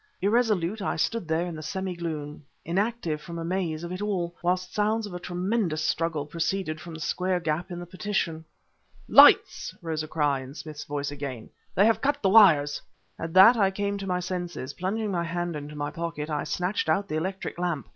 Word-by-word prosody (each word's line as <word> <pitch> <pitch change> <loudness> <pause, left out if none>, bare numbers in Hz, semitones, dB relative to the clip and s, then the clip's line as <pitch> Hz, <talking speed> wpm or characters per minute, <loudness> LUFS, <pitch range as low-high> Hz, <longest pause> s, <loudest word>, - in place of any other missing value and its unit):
Irresolute, 210 -2 +1
I - - -1
stood 205 +3 -1
there 160 +2 +1
in 175 -2 -5
the 155 - -7
semi 190 +3 -3
gloom 155 -3 -5 0.2
inactive 180 -3 -1
from 170 +2 -7
amaze 165 -1 -2
of 170 - -5
it 185 +2 -5
all 180 -5 -2
whilst 180 +1 -1
sounds 215 +1 +1
of 205 - -8
a 180 - -5
tremendous 180 -2 -1
struggle 160 -2 0
proceeded 165 +1 -2
from 170 -2 -8
the - - -8
square 180 +4 0
gap 165 +1 -2
in 175 -1 -5
the 175 - -6
partition. 180 -3 -2 0.6
"Lights!" - - +6
rose 160 -2 -3
a 155 - -5
cry, 145 -3 +1
in 130 +2 -9
Smith's 155 -2 -8
voice 145 0 -3
again 140 -5 -6 0.2
"they 200 - +5
have 225 0 +3
cut 285 +1 +1
the 195 - +4
wires!" 165 -9 +6 0.4
At 165 0 -5
that 195 +6 +9
I 200 -4 +3
came 200 +1 -2
to 195 - -5
my 180 -1 0
senses. 175 -6 -4
Plunging 205 +3 -2
my 175 -2 0
hand 175 0 -3
into 150 0 -7
my 145 0 -3
pocket, 160 -2 -4
I 150 -1 -1
snatched 180 -1 -1
out 195 +6 +2
the 155 - -2
electric 190 +2 -4
lamp... 170 -8 -2
175 Hz, 200 wpm, -27 LUFS, 155-190 Hz, 0.6 s, that